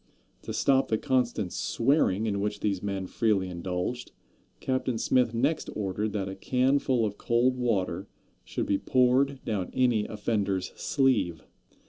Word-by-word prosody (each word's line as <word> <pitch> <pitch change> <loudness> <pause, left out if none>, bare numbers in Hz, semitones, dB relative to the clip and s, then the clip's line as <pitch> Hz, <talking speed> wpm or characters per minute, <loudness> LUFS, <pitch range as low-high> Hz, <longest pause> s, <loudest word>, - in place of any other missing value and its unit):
To - - -6
stop 135 -1 +2
the 110 - +1
constant 120 -7 0
swearing 115 -5 +1
in 100 -2 -1
which 105 0 -2
these 100 -3 0
men 100 -2 -3
freely 100 -2 0
indulged, 90 +7 -4 0.5
Captain 130 -2 -1
Smith 125 +1 +2
next 140 +7 0
ordered 105 +1 -2
that 100 -3 -2
a 95 - -4
canful 130 +3 +1
of 105 -1 -4
cold 120 +2 +2
water 100 -6 -1 0.4
should - - -3
be 100 - +1
poured 130 +2 +2
down 100 -5 -2
any 120 -5 +2
offender's 105 -3 -1
sleeve. 130 - +1
110 Hz, 140 wpm, -28 LUFS, 100-125 Hz, 0.5 s, stop